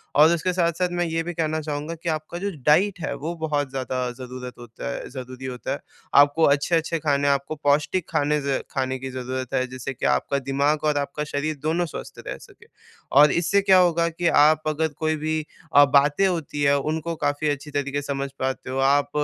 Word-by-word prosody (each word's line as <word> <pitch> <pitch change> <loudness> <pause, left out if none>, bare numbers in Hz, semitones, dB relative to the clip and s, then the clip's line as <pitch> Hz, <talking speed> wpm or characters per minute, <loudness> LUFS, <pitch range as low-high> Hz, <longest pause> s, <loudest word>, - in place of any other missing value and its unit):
और 155 +3 +7
उसके 170 +2 0
साथ-साथ 175 0 +1
मैं 175 - +2
ये 165 0 -1
भी 175 +1 -5
कहना 160 -1 -1
चाहूँगा 150 +2 -4
कि 170 - -1
आप 155 +2 -3
जो 200 - -1 0.2
डाइट 180 +5 +4
है, - - -2
वो 165 +4 -4
बहुत 145 -3 -1
ज़्यादा 130 -1 -2
ज़रूरत 125 0 -7
होता 115 - -8
है - - -6
ज़रूरी 130 0 -8
होता 125 -2 -5
है। - - -2 0.4
आपको 145 +3 +3
अच्छे-अच्छे 160 +3 +1
खाने 145 -2 +1
हैं, 140 - +5
आपको 140 +3 -5
पौष्टिक 150 +5 +1
खाने 150 +1 +1
से 140 -1 -1
खाने 130 -1 -2
की 135 0 -5
ज़रूरत 130 0 -5
है, 130 - +1
जिससे 130 +1 -6
कि - - -5
आपका 65 - +1
दिमाग़ 140 +3 0
और 150 -1 +2
आपका 145 +1 -2
शरीर 150 +1 -2
दोनों 165 +3 +1
स्वस्थ 160 - -8
रह - - -4
सकें। - - -17 0.4
और 145 +1 +7
इससे 175 +4 +2
क्या 190 -1 +5
होगा 170 -2 +3
कि 170 +1 -2 0.2
आप 155 +1 +4
अगर 155 +1 +1
कोई 155 0 +1
भी 155 0 -2 0.3
अ, 145 0 +9
बातें 145 +6 +3
होती 160 -5 -3
हैं, 140 0 +4
उनको 155 +4 -2
काफ़ी 145 +1 0
अच्छी 145 +1 -4
तरीक़े 145 0 -2
से 145 - -10
समझ 140 0 -3
पाते 130 0 -3
हो। 130 - -3
आप 145 0 +2
145 Hz, 210 wpm, -24 LUFS, 135-160 Hz, 0.4 s, अ